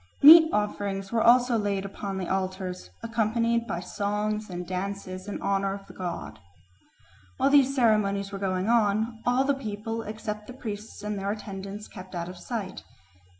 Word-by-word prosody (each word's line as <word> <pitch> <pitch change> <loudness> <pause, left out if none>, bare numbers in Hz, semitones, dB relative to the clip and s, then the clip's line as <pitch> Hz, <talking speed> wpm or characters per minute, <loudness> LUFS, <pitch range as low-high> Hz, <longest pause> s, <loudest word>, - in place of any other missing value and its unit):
Meat 320 +2 +10
offerings 200 -2 -2
were 230 -1 +2
also 240 0 +5
laid 200 -2 -1
upon 195 0 -5
the 185 -2 -3
altars, 185 - -3
accompanied 230 +1 +1
by 170 -5 -2
songs 210 +3 -2
and 180 -1 -5
dances 185 +1 -5
in 205 - -4
honour 195 0 +1
of 200 -1 -11
the - - -13
god. 180 -2 -5 1.0
While 275 - +3
these 275 -1 +5
ceremonies 205 -5 +2
were 195 - -5
going 185 0 -1
on, 225 0 +2
all 250 +2 +3
the 280 +1 +2
people 225 -3 -4
except 215 -1 -6
the 255 - -8
priests 215 -4 -7
and 210 -1 -3
their 195 +1 -2
attendants 200 0 -6
kept 185 0 -10
out 170 0 -3
of 180 -1 -9
sight. 220 -6 -5
205 Hz, 165 wpm, -27 LUFS, 195-230 Hz, 1.0 s, Meat